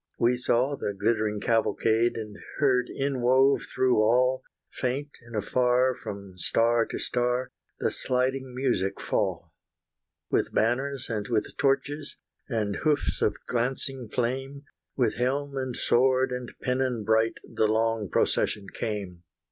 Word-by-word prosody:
We 120 +1 +3
saw 125 +3 +1
the 100 -6 -3
glittering 105 -1 +1
cavalcade, 115 +1 +2
And 105 -2 -6 0.2
heard 130 -4 +2
inwove 135 0 +2
through 130 -1 +2
all, 125 +4 +3 0.3
Faint 135 +3 -2
and 115 -1 -11
afar 125 +4 +2
from 100 -6 -8
star 115 +5 +3
to - - -4
star, 125 +1 -1 0.3
The - - 0
sliding 130 0 -1
music 120 -8 0
fall. - - -2 0.8
With - - 0
banners 130 +4 0
and 105 -3 -3
with 110 -3 -1
torches, 145 +2 0 0.3
And 105 -4 -1
hoofs 150 -3 0
of 105 - +1
glancing 125 0 -1
flame, 135 +4 -2 0.3
With 120 -5 +1
helm 140 +3 -1
and 130 -2 -3
sword 130 +1 +3
and 125 -1 -4
pennon 125 -3 0
bright 110 +1 +2
The 110 - 0
long 110 -1 0
procession 100 -2 +1
came. 100 -6 -4
125 Hz, 130 wpm, -27 LUFS, 110-130 Hz, 0.8 s, We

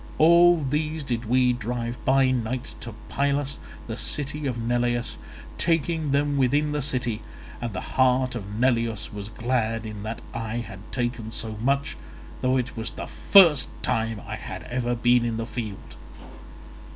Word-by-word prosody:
All 170 +2 +7
these 150 +3 -1
did 120 -3 -2
we 125 +2 +3
drive 120 0 -4
by 135 0 +4
night 125 0 -2
to 115 -3 -8
Pylus, 140 0 0 0.3
the 115 - -4
city 145 +3 -2
of 125 -3 -2
Neleus, 120 +1 0 0.4
taking 165 -1 +1
them 145 +1 +1
within 145 +3 +2
the 150 0 -1
city; 125 -5 -1 0.4
and 120 -1 -2
the 90 - -4
heart 130 0 +2
of 105 -3 -6
Neleus 115 -3 0
was 105 0 -6
glad 115 -1 -1
in 105 -2 -6
that 110 +2 -5
I 115 -1 -3
had 115 -5 -5
taken 120 -3 -2
so 110 0 -3
much, 140 - 0 0.4
though 130 +1 +2
it 130 0 -2
was 115 0 -3
the - - -6
first 170 -9 +6
time 115 -1 0
I - - -5
had - - -7
ever 120 0 -1
been 120 0 +4
in 115 -1 -1
the 115 - -2
field. 110 -5 -6
125 Hz, 160 wpm, -25 LUFS, 115-140 Hz, 0.4 s, All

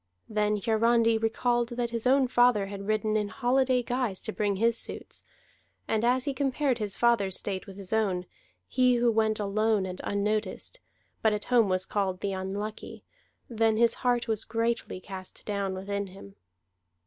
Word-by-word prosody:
Then 210 -1 +1
Hiarandi 230 +2 +3
recalled 235 +2 +1
that 240 -1 -1
his 230 +1 -1
own 265 0 +4
father 245 -4 +4
had 200 0 -7
ridden 215 0 +1
in 210 -1 +1
holiday 255 +1 +1
guise 245 -5 -1
to 220 - -5
bring 205 -2 0
his 230 +3 +2
suits; - - -3 0.6
and 220 0 0
as 250 +2 +2
he 280 - -1
compared 270 -1 0
his 205 -2 -3
father's 215 -6 +2
state 190 -2 -3
with 195 -1 -10
his 195 0 -6
own, 195 -5 +1 0.4
he 250 -1 +3
who 240 0 +3
went 220 -1 +1
alone 210 0 +1
and 185 -1 -6
unnoticed, 210 - -2 0.4
but 220 -1 +3
at 210 - -2
home 230 -5 +5
was 185 0 +1
called 190 -3 -1
the 200 -1 -1
Unlucky, 200 +3 -5 0.4
then 225 -2 +1
his 230 0 +4
heart 245 -1 +1
was 220 -1 0
greatly 230 -3 -2
cast 185 0 -9
down 200 -2 -2
within 200 +1 -3
him. 185 - -13
220 Hz, 170 wpm, -28 LUFS, 200-235 Hz, 0.6 s, home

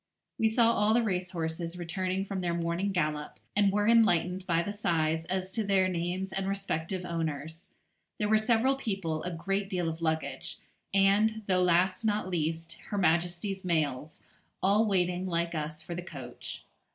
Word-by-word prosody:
We 225 -1 +4
saw 230 +1 +4
all 215 +1 +3
the 240 - +4
racehorses 180 -3 -2
returning 185 +2 -2
from 195 -1 -3
their 170 -1 0
morning 170 +4 -1
gallop, 150 -5 -2 0.2
and 200 -1 +4
were 205 +1 +1
enlightened 185 -5 +3
by 170 -1 +2
the 205 - -3
syces 165 -5 0
as 185 0 -1
to 220 - -1
their 195 -2 +3
names 180 +2 -2
and 195 0 -1
respective 190 -2 -2
owners. 160 -1 -4 0.5
There 210 - 0
were 215 +1 +4
several 235 +4 +3
people, 195 -11 -2
a 180 - -3
great 195 +4 -2
deal 180 -3 -1
of 165 0 -4
luggage, 160 -4 -2 0.3
and, 205 +3 +3
though 185 -2 +2
last 180 +4 +3
not 210 -3 0
least, 165 0 -2
Her 205 - -4
Majesty's 175 +2 +1
mails, 155 -4 -1 0.4
all 205 +3 +4
waiting, 180 -2 +1
like 170 -1 0
us, 155 0 -4
for 170 - -6
the 175 - -4
coach. 135 -8 -8
180 Hz, 165 wpm, -30 LUFS, 165-200 Hz, 0.5 s, We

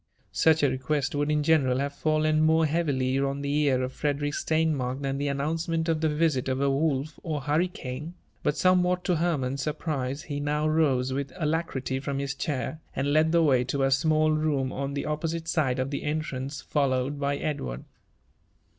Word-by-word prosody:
Such 160 -1 +3
a - - +6
request 140 +4 -1
would 145 0 0
in 150 -1 +1
general 145 -5 +3
have 140 +1 -2
fallen 155 +1 +1
more 160 +1 +4
heavily 140 -5 0
on 140 +1 -1
the 140 0 -1
ear 140 -4 +2
of 130 +1 -4
Frederick 145 0 -1
Steinmark 150 -6 0
than 135 0 -1
the 145 - -1
announcement 160 +4 -1
of 160 -1 +1
the 160 - +2
visit 150 -4 +1
of 130 0 -1
a 140 0 +2
wolf 145 +1 -1
or 155 -3 -3
hurricane; 150 0 -2 0.3
but, 150 - 0
somewhat 180 +1 +3
to 180 - +1
Herman's 140 -5 0
surprise, 145 -2 -3
he 145 -2 -4
now 150 +1 0
rose 135 -5 +2
with 140 0 -3
alacrity 150 -5 -1
from 140 0 -3
his 140 0 -2
chair, 140 +1 -3 0.2
and 140 +1 0
led 155 +1 +4
the 170 0 +4
way 130 -5 +4
to 135 +2 -1
a 135 - +2
small 155 +2 +3
room 150 -4 0
on 140 +1 -3
the 140 - -2
oppo 155 +2 -2
site 165 0 -4
side 150 -6 +1
of 130 +2 -2
the 140 - -2
entrance, 150 -2 -3
followed 140 -1 0
by 140 0 0
Edward. 65 - -3
145 Hz, 190 wpm, -27 LUFS, 135-155 Hz, 0.3 s, a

